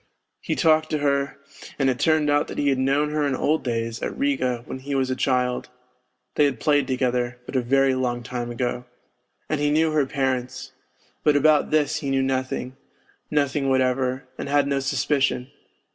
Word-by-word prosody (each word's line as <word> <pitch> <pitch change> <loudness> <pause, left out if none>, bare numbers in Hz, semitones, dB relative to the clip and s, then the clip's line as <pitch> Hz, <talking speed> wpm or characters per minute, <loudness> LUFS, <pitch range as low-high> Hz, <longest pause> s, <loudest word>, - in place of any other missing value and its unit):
He - - -2
had - - -4
talked 155 -1 +3
to 155 - 0
her, 140 -1 0 0.4
and 135 - +1
it 125 -2 0
turned 155 +1 +2
out 145 0 +2
that - - -8
he 145 - +2
had 135 -1 +1
known 140 +3 +1
her 150 0 0
in 135 - 0
old 155 +4 0
days 115 -2 -3
at - - -4
Riga 190 - 0
when 130 - -6
he 140 +1 -4
was 130 -1 0
a - - 0
child, 125 -1 0 0.6
they 150 - +3
had 135 -5 -1
played 145 -1 +2
together, 125 -2 -1
but - - -8
a 130 - +3
very 135 +2 +3
long 125 -2 -1
time 120 0 -4
ago 120 +1 -3 0.6
and 155 - -1
he 145 - +2
knew 155 +2 +2
her 150 -3 +1
parents, 130 -2 -2 0.5
but 150 -1 +4
about 150 +1 +4
this 150 -1 +1
he 145 -2 -4
knew 135 0 +1
nothing, 130 -1 -2 0.5
nothing 140 -2 0
whatever, 130 0 0
and - - -4
had 145 0 +3
no 140 -1 0
suspicion 135 -1 0
135 Hz, 190 wpm, -24 LUFS, 125-145 Hz, 0.6 s, but